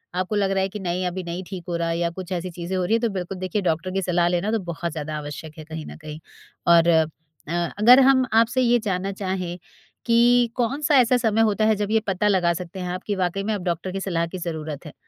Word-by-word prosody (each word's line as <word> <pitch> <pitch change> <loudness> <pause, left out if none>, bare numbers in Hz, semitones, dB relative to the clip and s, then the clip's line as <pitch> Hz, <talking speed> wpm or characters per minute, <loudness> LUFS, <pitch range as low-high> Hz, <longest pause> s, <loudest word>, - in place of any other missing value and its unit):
आपको 185 +3 -1
लग 200 -1 +1
रहा 195 0 +1
है 190 - -1
कि 210 - -7
नहीं 180 -1 -2
अभी 185 +1 -4
नहीं 175 +2 -5
ठीक 185 -3 -7
हो 170 - -1
रहा 170 0 -1
है 165 - -1
या 170 0 0
कुछ 185 0 -7
ऐसी 180 0 -3
चीज़ें 175 +2 -5
हो 185 - 0
रही 215 - 0
हैं, 230 - +2
तो 235 - +1
बिल्कुल 190 -1 -5
देखिए 185 +3 -2
डॉक्टर 165 +4 -2
की 195 +1 -1
सलाह 175 -1 +1
लेना 175 +4 0
तो 225 - +1
बहुत 170 +1 -4
ज़्यादा 155 0 -5
आवश्यक 150 +1 -8
है 155 - -8
कहीं 160 -1 -7
न - - -9
कहीं। 150 0 -7 0.5
और, 170 -1 +6
अ, 160 -2 +5 0.7
अगर 245 +5 +8
हम 260 -1 +4
आपसे 230 +3 +3
ये 240 -1 +4
जानना 190 +1 -1
चाहें, 185 -3 -4 0.5
कि 240 +1 +4
कौन 255 +4 -1
सा 295 0 +3
ऐसा 250 0 +4
समय 225 -2 +1
होता 210 0 +1
है 220 0 +4
जब 205 - -1
ये 220 - +4
पता 195 +2 +1
लगा 185 -4 +3
सकते 180 +2 -7
हैं 180 -1 -4
आप 185 - -6
कि 205 - 0
वाक़ई 185 +1 -1
में 215 +2 -1
अब 200 -3 -4
डॉक्टर 175 +1 -2
की 195 - -3
सलाह 170 -4 -1
की 185 - -7
ज़रूरत 160 -3 -5
है? 150 - -9
185 Hz, 265 wpm, -23 LUFS, 170-210 Hz, 0.7 s, अगर